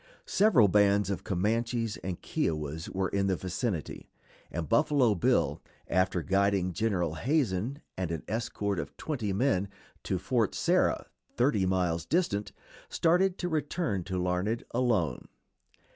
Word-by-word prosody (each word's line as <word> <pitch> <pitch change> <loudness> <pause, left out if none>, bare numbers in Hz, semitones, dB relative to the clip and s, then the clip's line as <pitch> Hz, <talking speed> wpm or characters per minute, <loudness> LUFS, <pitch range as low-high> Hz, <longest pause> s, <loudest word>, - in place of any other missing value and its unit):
Several 190 - +5
bands 100 0 +3
of 100 - -3
Comanches 115 +4 0
and 90 -1 -5
Kiowas 75 0 -2
were 95 -1 -1
in 100 0 0
the 95 - +2
vicinity, 95 - -4 0.4
and 80 -1 -4
Buffalo 140 - +3
Bill, 90 - +1 0.3
after 95 -1 +1
guiding 95 -1 +1
General 90 -4 0
Hazen 125 - -1
and 95 -3 -2
an 80 -2 -4
escort 100 -3 -2
of 75 -3 -6
twenty 125 -10 -3
men 100 -2 +1 0.3
to 95 - -1
Fort 105 +4 0
Sarah, - - +2 0.3
thirty 120 -6 +2
miles 90 -3 0
distant, 145 - 0 0.4
started 180 +3 +2
to 180 - -2
return 155 - -1
to 95 -1 -3
Larned 90 +5 -1
alone. 115 -9 0
100 Hz, 130 wpm, -29 LUFS, 90-120 Hz, 0.4 s, Several